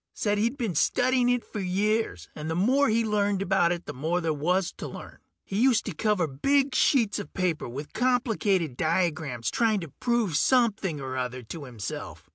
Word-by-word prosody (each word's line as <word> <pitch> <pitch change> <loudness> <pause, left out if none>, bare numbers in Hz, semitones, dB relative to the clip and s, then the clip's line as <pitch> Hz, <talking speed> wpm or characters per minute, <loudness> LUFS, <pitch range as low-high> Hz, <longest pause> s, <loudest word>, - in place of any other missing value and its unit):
Said 205 -1 0
he'd 235 +6 0
been 230 - -2
studying 245 - +2
it 245 -1 +1
for 210 - -6
years, 195 - -1
and 155 +1 -6
the 160 - -1
more 255 +10 +3
he 225 +1 +2
learned 205 -2 +1
about 180 -3 +2
it 175 -1 -3
the - - -6
more 160 +7 -1
there 165 -2 0
was 175 +5 0
to - - -5
learn. - - -10 0.3
He 195 +3 -2
used 255 -3 +3
to 205 - -4
cover 210 0 +1
big 270 - +1
sheets 230 -8 +3
of 205 - -9
paper 175 -8 -1
with 140 +5 -7
complicated 215 - +1
diagrams 155 -8 0
trying 220 -3 +2
to 165 - -7
prove 235 -9 +1
something 210 - +2
or 130 -1 -5
other 125 0 -3
to 140 +6 -8
himself. 115 -6 -7
195 Hz, 190 wpm, -27 LUFS, 155-230 Hz, 0.3 s, more